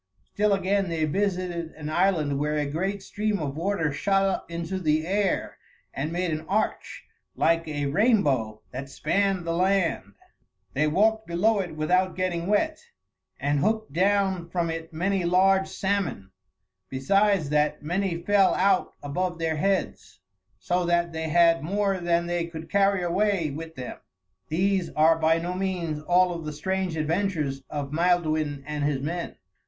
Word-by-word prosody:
Still 210 0 +2
again 195 0 +1
they 160 -2 0
visited 180 -1 -2
an 150 -1 -8
island 155 -4 +1
where 150 +1 0
a 150 - 0
great 190 +7 -2
stream 210 +1 -1
of 145 -5 -4
water 165 -3 -1
shot 195 +5 +1
up 195 -3 -2
into 170 +2 -4
the 155 -2 +1
air 195 +1 -1 0.3
and 150 +4 -3
made 175 0 -1
an 155 0 -3
arch 210 +3 -2 0.3
like 165 0 +2
a 145 -2 -2
rainbow 140 - +1
that 135 +2 -6
spanned 195 +5 0
the 165 - -1
land. 180 - +1 0.6
They 150 +3 +2
walked 220 +7 +2
below 200 +6 +2
it 180 -5 -4
without 180 +4 +1
getting 180 -2 -2
wet, 310 +10 +1 0.6
and 145 +1 +1
hooked 220 0 0
down 190 -1 +1
from 170 -1 -1
it 165 +1 -6
many 185 +3 0
large 190 +2 +3
salmon; 190 - -2 0.6
besides 190 +4 +2
that, 150 0 +1
many 175 +1 -1
fell 200 0 +4
out 190 0 +2
above 175 +5 -2
their 160 -1 -1
heads, 195 +4 -1 0.4
so 180 +1 -1
that 170 -1 +1
they 160 0 -3
had 165 0 +4
more 195 +3 0
than 170 -1 +1
they 175 -1 -1
could 160 -1 -9
carry 200 -2 +3
away 175 -2 +1
with 160 +3 -7
them. 125 -1 -7 0.5
These 185 +2 +1
are 160 +1 +4
by 160 +1 +3
no 175 +2 -3
means 180 -5 -2
all 180 +3 +3
of 165 -1 -6
the 150 - -4
strange 185 +2 -2
adventures 155 -4 -1
of 145 -1 -4
Maelduin 155 -4 +1
and 150 -1 -3
his 145 -2 0
men. 170 +5 -4
170 Hz, 160 wpm, -26 LUFS, 155-195 Hz, 0.6 s, fell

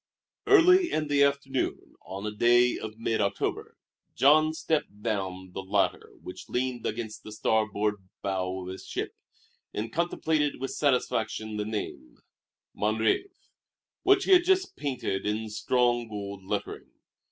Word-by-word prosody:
Early 365 -2 +6
in 155 -1 -1
the 145 -1 +3
afternoon, 140 -1 0
on 95 +2 -6
a 105 - -2
day 120 +3 +4
of 110 0 -7
mid 115 -1 0
October, 100 -1 -2 0.4
Jean 155 +3 +5
stepped 150 -10 -2
down 95 -4 -3
the 95 - -5
ladder 95 +1 0
which - - -9
leaned 125 -1 -1
against 110 -1 -5
the 110 - -10
starboard 105 -2 0 0.2
bow 95 -1 -2
of 90 - -7
his 95 - -7
ship, - - -4 0.6
and 110 +2 -3
contemplated 160 -4 0
with 135 +1 -3
satisfaction 110 -6 0
the 105 - -2
name, 100 - -5 0.6
"Mon 105 +1 0
Rêve," 110 - +1 0.7
which 390 0 +4
he - - 0
had 360 -2 +8
just 380 +1 +2
painted 125 -9 -2
in 110 +1 -2
strong, 120 +1 +1
gold 100 -2 -6
lettering. - - -4
110 Hz, 140 wpm, -28 LUFS, 105-140 Hz, 0.7 s, had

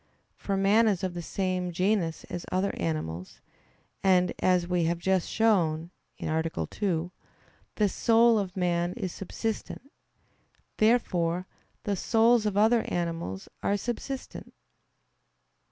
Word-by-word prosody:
For 195 -1 -2
man 205 +4 +4
is 195 -4 0
of 185 -2 -1
the 175 - -5
same 185 0 -2
genus 180 -2 0
as 175 -1 -6
other 185 +2 +1
animals; 80 +1 -4 0.6
and, 185 -2 +4
as 180 -2 +2
we 175 -2 +1
have 170 +1 0
just 185 +1 0
shown 175 -7 +2 0.3
(A. 160 +1 0 0.3
2), 175 -3 -1 0.6
the 210 - +3
soul 230 +2 +4
of 190 -2 -4
man 175 -1 0
is 195 -7 -4
subsistent. 225 +7 -5 0.9
Therefore 185 -6 +2 0.4
the 205 - -1
souls 225 +2 +3
of 200 -1 -1
other 225 +2 +5
animals 165 - -3
are 200 - +1
subsistent. 245 +4 -6
185 Hz, 120 wpm, -28 LUFS, 170-215 Hz, 0.9 s, other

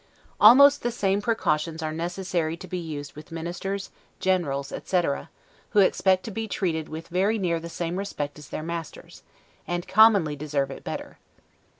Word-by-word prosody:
Almost 280 +7 +8
the 240 - 0
same 200 -4 0
precautions 165 -7 0
are 155 - -2
necessary 170 -1 -2
to 185 - -10
be 180 +1 -4
used 150 -4 -6
with 155 +3 -12
ministers, 180 +4 -4 0.3
generals, 145 -8 0
etc., 175 -6 -1 0.4
who 210 - +5
expect 190 -1 +3
to 220 - -6
be 225 +2 -4
treated 165 -6 -2
with 160 +1 -7
very 195 +5 +1
near 175 -5 0
the 170 +1 -8
same 170 +1 -3
respect 150 -7 -4
as 150 - -12
their 155 - -5
masters, 165 -1 -7 0.5
and 175 0 -3
commonly 200 -8 +5
deserve 140 -2 -2
it - - -9
better. - - -6
175 Hz, 165 wpm, -25 LUFS, 155-195 Hz, 0.5 s, Almost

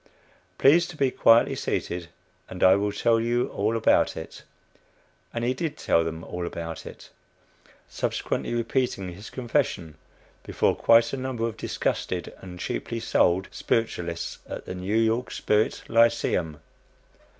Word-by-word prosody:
Please 165 +5 +5
to 170 - -10
be 135 -3 +2
quietly 115 -1 +5
seated, 85 -1 -3 0.4
and 90 - -4
I 95 0 +7
will 100 +1 0
tell 115 +2 +2
you 120 +2 0
all 110 +3 -1
about 115 - +3
it." - - -8 0.9
And 115 - -3
he 125 - +1
did 155 +4 -4
tell 85 - +2
them 80 0 -5
all 90 -1 -5
about 85 -1 -6
it; - - -12 0.8
subsequently - - -2
repeating 115 -6 -1
his 100 +5 -10
confession 120 - -2 0.4
before - - 0
quite 115 +1 +4
a - - -1
number 130 -3 -3
of 115 -2 -3
disgusted 90 -4 -3
and 90 -1 -10
cheaply 115 - -3
sold 95 -4 +2
spiritualists 85 -7 -2
at - - -6
the - - -5
"New 95 +4 -2
York 115 +2 +1
Spiritual 105 +2 -1
Lyceum." 90 -9 +2
110 Hz, 140 wpm, -26 LUFS, 90-120 Hz, 0.9 s, I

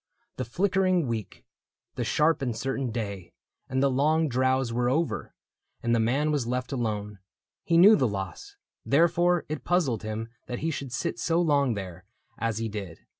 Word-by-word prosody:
The 130 - -2
flickering 185 - +1
week. 115 -4 -5 0.5
The - - -3
sharp 155 0 +2
and 120 -4 -2
certain 135 +1 -2
day, 100 -6 -5 0.4
and 130 +1 +1
the 140 - +3
long 155 +4 +2
drowse 130 -1 +1
Were 120 +1 +1
over, 160 +5 -1 0.5
and 115 - +1
the 115 - +3
man 135 +7 +1
was 140 -6 0
left 125 +1 -2
alone. 105 -5 -3 0.4
He 165 - +2
knew 200 +6 +9
the 130 -8 +2
loss 95 -4 -6 0.2
— - - -66
Therefore 170 +4 +3
it 155 -1 -5
puzzled 150 - +1
him 110 +1 -4 0.2
That 125 - -4
he 165 - +1
should 140 -3 -5
sit 115 -1 -3
so 165 +5 +1
long 140 -7 +2
there 95 -2 -7 0.3
as 115 -2 -1
he 115 0 -2
did. 100 -6 -7
130 Hz, 175 wpm, -27 LUFS, 115-155 Hz, 0.5 s, knew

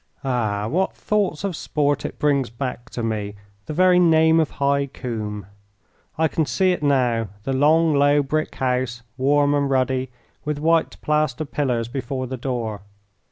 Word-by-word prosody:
Ah! 110 -6 -1
what 185 +10 0
thoughts 200 -6 -1
of 195 -4 -2
sport 145 -1 -1
it - - -5
brings 140 -4 +1
back 120 0 -5
to 120 - -5
me, 105 -2 -3 0.3
the - - -4
very 180 +1 +5
name 160 -1 +5
of 160 - +1
High 140 0 0
Combe! 105 -6 -5 0.7
I 160 0 +3
can 160 - 0
see 185 +9 +2
it 180 - -2
now, 125 -6 +1 0.2
the 135 - -2
long, 155 +4 +4
low 145 0 +4
brick 155 +3 -2
house, 125 -2 -1
warm 145 +2 +2
and 140 -1 +1
ruddy, 130 -1 0 0.3
with 150 -1 -2
white 165 +2 +1
plaster 150 -1 0
pillars 125 -5 -1
before 130 +1 -4
the 130 +1 -5
door. 120 -5 -3
140 Hz, 160 wpm, -22 LUFS, 125-155 Hz, 0.7 s, very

